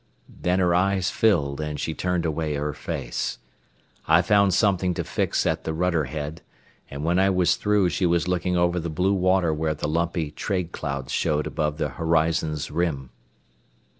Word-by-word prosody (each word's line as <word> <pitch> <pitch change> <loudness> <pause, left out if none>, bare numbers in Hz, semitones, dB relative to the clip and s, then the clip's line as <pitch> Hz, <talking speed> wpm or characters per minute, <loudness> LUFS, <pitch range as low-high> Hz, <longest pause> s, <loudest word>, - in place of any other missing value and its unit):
Then 90 +1 -1
her 90 -2 +3
eyes 95 +1 +1
filled 80 -10 +1
and 75 -1 -4
she 80 - -2
turned 90 0 -1
away 80 -1 -1
her 75 +1 -2
face. - - -4 0.7
I 80 +2 +5
found 100 0 +4
something 95 -2 +2
to - - -2
fix - - -1
at - - 0
the 80 - -3
rudder 85 -2 +1
head, 75 +3 -5 0.5
and 70 +1 -6
when 85 +3 +2
I 95 +1 +4
was 90 -2 +3
through 105 -3 +2
she 90 - 0
was 85 0 +1
looking 90 0 0
over 85 0 +2
the 85 0 -4
blue 90 +5 +1
water 95 -3 +2
where 75 0 -1
the 75 - -3
lumpy 85 -1 -1
trade 90 0 -3
clouds 70 -5 -4
showed 75 -2 0
above 75 -1 -2
the 75 -2 -1
horizon's 80 -1 0
rim. 75 -6 -2
85 Hz, 175 wpm, -24 LUFS, 75-90 Hz, 0.7 s, I